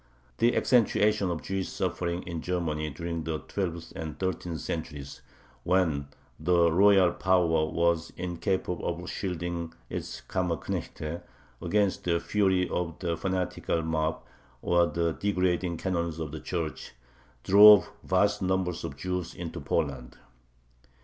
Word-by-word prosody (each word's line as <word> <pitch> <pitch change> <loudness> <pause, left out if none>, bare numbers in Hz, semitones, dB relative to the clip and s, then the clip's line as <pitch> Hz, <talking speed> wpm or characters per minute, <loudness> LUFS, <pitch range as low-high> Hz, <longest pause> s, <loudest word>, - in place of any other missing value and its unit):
The 120 +1 +3
accentuation 105 -5 +3
of 85 -2 -3
Jewish 95 -1 -2
suffering 85 0 -2
in 85 -2 -5
Germany 80 -4 -2
during 85 +2 -4
the 80 0 -2
twelfth 85 -2 -4
and 80 -1 -5
thirteenth 90 -3 -3
centuries, 75 -4 -5 0.4
when 80 -3 +1 0.3
the 85 +1 +3
royal 95 0 +5
power 85 -4 +2
was 85 0 +1
incapable 90 +1 -2
of 85 +1 -3
shielding 85 -3 -4 0.2
its - - -5
Kammerknechte 85 -2 -3 0.4
against 100 +2 +1
the 85 -1 +2
fury 95 -1 +1
of 85 -2 -3
the 85 -2 -2
fanatical 90 -2 -1
mob 80 0 -1 0.4
or 85 0 +3
the 85 +1 0
degrading 90 -3 0
canons 85 -3 -2
of 80 -3 -4
the 80 - -6
Church, 85 -3 -4 0.5
drove 105 +1 +8
vast 100 +2 +2
numbers 95 -2 0
of 70 - -6
Jews 90 +1 -3
into 85 -2 -6
Poland. 65 -4 -2
85 Hz, 125 wpm, -28 LUFS, 80-95 Hz, 0.5 s, drove